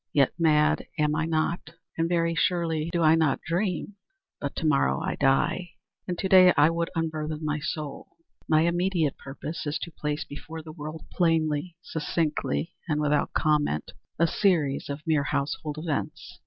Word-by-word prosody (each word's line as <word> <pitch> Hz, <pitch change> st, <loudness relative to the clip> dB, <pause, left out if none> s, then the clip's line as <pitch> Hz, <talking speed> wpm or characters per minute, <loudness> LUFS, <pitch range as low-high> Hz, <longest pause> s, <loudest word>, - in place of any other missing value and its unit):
Yet, 140 Hz, -3 st, +4 dB
mad 155 Hz, -2 st, +3 dB
am 150 Hz, 0 st, +2 dB
I 160 Hz, +1 st, 0 dB
not—and 165 Hz, 0 st, -2 dB
very 170 Hz, -1 st, +1 dB
surely 165 Hz, -2 st, 0 dB
do 170 Hz, -1 st, +1 dB
I 155 Hz, 0 st, +6 dB
not 160 Hz, -4 st, +2 dB
dream. 185 Hz, +3 st, -2 dB, 0.4 s
But 140 Hz, -, -4 dB
to -, -, -3 dB
morrow 65 Hz, -, +3 dB
I -, -, -2 dB
die, 150 Hz, +6 st, +1 dB, 0.3 s
and 180 Hz, -1 st, -2 dB
to 190 Hz, -, -1 dB
day 185 Hz, -1 st, +8 dB
I 150 Hz, +3 st, +6 dB
would 170 Hz, 0 st, -1 dB
unburthen 155 Hz, -1 st, -2 dB
my 150 Hz, 0 st, -1 dB
soul. 150 Hz, -1 st, -5 dB, 0.4 s
My 155 Hz, -1 st, +5 dB
immediate 170 Hz, -2 st, +1 dB
purpose 145 Hz, +3 st, -6 dB
is 145 Hz, -, -1 dB
to 170 Hz, -, -6 dB
place 150 Hz, -1 st, -3 dB
before 160 Hz, +2 st, -8 dB
the 155 Hz, -, -9 dB
world, 155 Hz, 0 st, -7 dB
plainly, 165 Hz, -1 st, +1 dB
succinctly, 160 Hz, +1 st, -2 dB, 0.2 s
and 150 Hz, -1 st, +1 dB
without 150 Hz, 0 st, +1 dB
comment, 150 Hz, -, +1 dB, 0.3 s
a 170 Hz, -, +4 dB
series 160 Hz, -7 st, +1 dB
of 145 Hz, +2 st, -5 dB
mere 155 Hz, -3 st, +2 dB
household 145 Hz, +1 st, -2 dB
events. 155 Hz, -1 st, -4 dB
155 Hz, 160 wpm, -27 LUFS, 150-170 Hz, 0.4 s, day